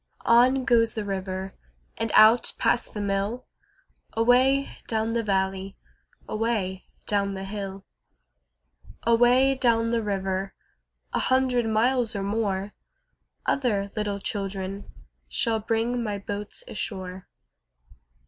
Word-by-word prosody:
On 250 +3 +5
goes 230 -3 +3
the 215 -2 -3
river 190 -1 -4 0.4
And 225 -1 -2
out 220 +3 +6
past 235 - 0
the 210 - -2
mill, 200 +4 -2 0.7
Away 255 +4 +3
down 225 0 -1
the 235 - +1
valley, 195 -2 -1 0.5
Away 215 -4 -2 0.2
down 200 -1 0
the 190 - -5
hill. 195 -1 -6 1.2
Away 245 +3 +4
down 230 -3 +2
the 235 -1 +1
river, 195 -2 -2 0.6
A - - +1
hundred 255 -2 +2
miles 235 +1 +2
or 200 - -2
more, 200 -1 -1 0.7
Other 205 -7 0
little 210 -2 -1
children 195 -1 -4 0.4
Shall 225 -1 0
bring 230 +3 -1
my 210 -3 -2
boats 205 - -6
ashore. 185 - -5
215 Hz, 110 wpm, -26 LUFS, 195-235 Hz, 1.2 s, out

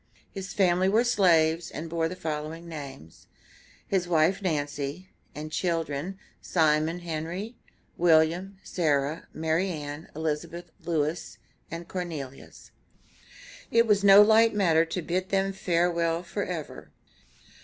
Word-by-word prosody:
His 195 0 -6
family 185 -1 +3
were 220 +4 +4
slaves, 170 -8 +3
and 155 +3 -6
bore 165 0 -1
the 185 - -6
following 160 0 -5
names: 140 - -10 0.6
his 185 -3 0
wife, 175 +4 +2
Nancy, 150 0 -3 0.3
and 155 +1 -6
children, 165 +1 -2 0.2
Simon 160 +1 +1
Henry, 175 +7 -5 0.4
William, 170 +3 +3
Sarah, 150 -2 -1
Mary 160 +4 0
Ann, 150 -2 -6
Elizabeth, 160 +2 -4
Louis, 160 0 -2 0.3
and 170 +1 -7
Cornelius. 160 -8 -7 1.0
It 230 0 +4
was 205 -3 +2
no 200 +1 +9
light 220 +1 +5
matter 165 -5 +3
to 165 +1 -4
bid 185 +3 -2
them 195 -1 +1
farewell 170 -2 0
forever. 175 -4 -5
170 Hz, 115 wpm, -27 LUFS, 155-185 Hz, 1.0 s, no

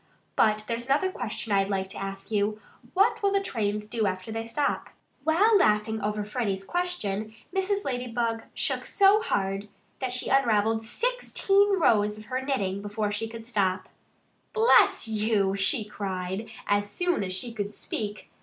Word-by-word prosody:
But 215 -1 +3
there's 235 +1 -3
another 295 +8 +2
question 230 - -5
I'd 195 0 +3
like 190 -1 -1
to - - -7
ask 195 +1 -6
you: 210 0 0 0.4
What 395 +4 +3
will 400 -1 +2
the 395 - +3
trains 210 - -2
do 215 0 -1
after 185 +3 -4
they 225 +1 -3
stop?" 280 +5 -1 0.3
While 395 +8 +4
laughing 215 - +2
over 210 0 -1
Freddie's 205 -4 -2
question 220 - -2 0.2
Mrs. 395 +1 0
Ladybug 240 -3 -2
shook - - 0
so 400 +1 +5
hard 200 - -1 0.3
that 260 -2 -2
she 250 - -2
unravelled 225 -4 +3
sixteen 405 - +1
rows 210 -8 +3
of 215 - -11
her 255 - 0
knitting 200 -8 -1
before 205 0 -2
she 215 +2 -2
could 225 0 -9
stop. 190 -5 0 0.6
"Bless 450 - +5
you!" 210 -3 +1
she 200 +3 +3
cried, 195 0 -4 0.2
as 205 0 +1
soon 355 - 0
as 185 -1 -3
she 230 +6 -4
could 205 -2 -3
speak. 210 0 -5
220 Hz, 160 wpm, -27 LUFS, 205-265 Hz, 0.6 s, so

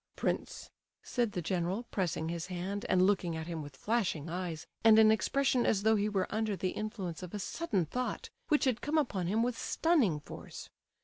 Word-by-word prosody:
"Prince," - - -3 0.3
said 240 -4 -1
the 175 - -3
general, 180 +5 -1
pressing 170 -4 -1
his 170 0 -3
hand, 190 +3 -4
and 185 0 +4
looking 185 -4 +1
at 160 - -4
him 165 -2 -4
with 145 -2 -9
flashing 180 - -1
eyes, 175 -3 -4 0.2
and 220 -1 +8
an 220 -1 +7
expression 255 +4 +2
as 200 -2 +2
though 220 +1 +5
he 210 0 +1
were 195 -3 0
under 215 -1 0
the 185 -1 -1
influence 190 -6 -4
of 180 +2 -7
a - - -1
sudden 205 - -1
thought 250 +10 -3 0.2
which 300 -3 +3
had 250 -3 +1
come 300 +2 0
upon 205 - 0
him 220 +5 +2
with 245 0 0
stunning 255 - +2
force. - - -10
200 Hz, 195 wpm, -32 LUFS, 175-225 Hz, 0.3 s, and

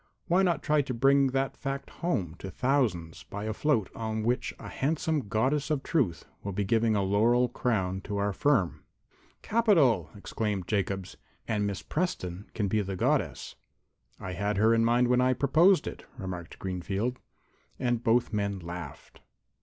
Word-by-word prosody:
"Why 180 +2 +3
not 175 -5 +1
try 150 -1 +3
to 130 -3 -4
bring 135 +3 +4
that 135 +1 -1
fact 135 0 -5
home 100 - -1
to 95 - -6
thousands 105 - 0
by 100 +1 -7
a 110 - -2
float 115 -6 +1
on 110 -1 -3
which 120 +3 0
a - - -9
handsome 150 -2 -1
Goddess 135 +9 0
of 145 -3 0
Truth 115 - 0 0.2
will 100 - -4
be 100 +2 0
giving 110 +2 +2
a 100 - +1
laurel 115 +6 +3
crown 95 -6 -1
to 105 - -3
our 100 0 0
firm?" 115 -8 +1 0.6
"Capital!" 155 - +3
exclaimed 100 -2 -3
Jacobs. 95 -2 -2 0.3
"And 105 -2 0
Miss 100 -3 -4
Preston 105 - -3
can 105 -3 0
be 105 +2 +1
the 95 -1 -4
Goddess." - - 0 0.7
"I 95 - -5
had 100 +2 -1
her 110 +3 +4
in 115 0 +3
mind 120 +2 +3
when 125 0 +3
I 130 0 +3
proposed 155 +7 +4
it," - - -7
remarked 90 -5 -6
Greenfield. 95 +7 -3 0.6
And 120 -2 0
both 115 0 +2
men 100 -1 -1
laughed. 85 -4 -9
110 Hz, 165 wpm, -29 LUFS, 100-135 Hz, 0.7 s, bring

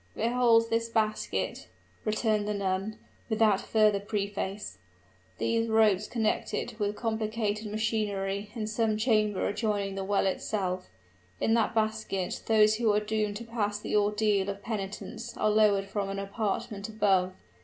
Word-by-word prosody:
"Behold 230 -1 +3
this 230 0 +1
basket," 215 -1 -1 0.4
returned 215 -1 +1
the 210 - -1
nun, 195 +2 -2 0.3
without 215 -3 +3
further 215 -2 +3
preface 200 - -3 0.6
"these 230 0 +1
ropes 215 -2 +4
connect 225 -3 -1
it 235 -2 -4
with 205 0 0
complicated 220 -1 -2
machinery 210 -2 -1
in 220 -2 -2
some 215 0 0
chamber 215 -3 +2
adjoining 205 -2 -1
the 195 0 -3
well 200 +1 +1
itself. 185 -1 -2 0.5
In 225 - +2
that 230 0 +2
basket 215 -4 -1
those 215 -1 +5
who 225 -2 +3
are 205 - +3
doomed 210 -1 -1
to 235 - -7
pass 210 -3 -2
the 210 - -3
ordeal 210 -1 +2
of 200 0 -5
penitence 205 -3 -5
are 215 - +2
lowered 210 -2 +4
from 195 0 -3
an 195 - -3
apartment 200 +1 -3
above. 195 -4 +2
210 Hz, 145 wpm, -29 LUFS, 200-220 Hz, 0.6 s, those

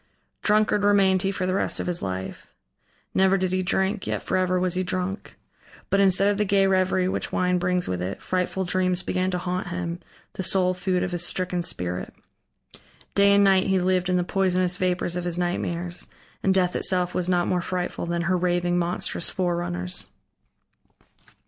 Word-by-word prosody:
Drunkard 210 -1 +2
remained 195 -2 +4
he 195 - 0
for 185 -1 -2
the 185 - 0
rest 195 - 0
of - - -2
his 175 -1 -2
life; 95 0 -5 0.7
never 190 0 +4
did 185 -1 -1
he 185 0 +1
drink, 190 +2 -1
yet - - -2
forever 185 0 +1
was 180 -1 +1
he 185 - 0
drunk. 185 +2 -3 0.6
But 195 - +3
instead 195 0 +5
of 205 0 +1
the - - +3
gay 195 -1 +3
reverie 185 -1 +2
which - - -2
wine 180 0 +1
brings 180 0 0
with 90 -1 -2
it, 95 +2 -4
frightful 185 +1 -2
dreams 185 0 0
began 185 0 -1
to 180 - -1
haunt 180 0 -3
him, 175 -1 -4 0.3
the - - -4
sole 185 0 +2
food 185 0 -1
of 185 - -2
his 175 -1 -1
stricken 180 0 -1
spirit. 90 - -4 1.0
Day 200 0 +5
and 200 0 +5
night 195 -1 +4
he 190 -1 +2
lived 185 0 +1
in 180 - +2
the 180 - +1
poisonous 185 -1 +1
vapors 180 -1 -1
of 180 - -2
his 175 -1 -1
nightmares, 175 0 -2 0.3
and 190 - +2
death 185 -2 +2
itself 180 -1 +1
was 180 0 -1
not 175 -1 +2
more 180 -1 +1
frightful 180 -1 -3
than 170 0 -1
her 185 +2 +1
raving, 175 0 +1
monstrous 170 -1 -1
forerunners. 170 - -2
180 Hz, 185 wpm, -25 LUFS, 175-190 Hz, 1.0 s, instead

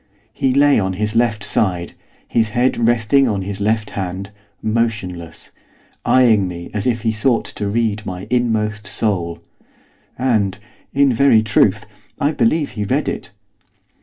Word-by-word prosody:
He 130 - +1
lay 140 0 +4
on 95 -2 -1
his 105 +3 -2
left 115 -3 +1
side, 90 -5 0 0.3
his 115 -2 +1
head 120 -2 +2
resting 120 +3 +3
on 100 -4 -1
his 100 +1 -5
left 110 +1 0
hand; 95 +1 -5 0.3
motionless, 105 -7 -3 0.5
eyeing 115 -7 +4
me 85 -1 -7
as 105 +1 -1
if 115 -2 0
he 110 - +2
sought 115 +2 +1
to 105 - -5
read 110 -1 0
my 90 0 -6
inmost 110 -3 0
soul. 85 -6 -2 0.7
And, 110 -7 +1 0.3
in 140 -1 +3
very 115 -3 +4
truth, 110 -2 +2 0.3
I 145 - +2
believe 145 +3 +1
he 105 - -4
read 100 - 0
it. - - -4
110 Hz, 145 wpm, -19 LUFS, 100-120 Hz, 0.7 s, lay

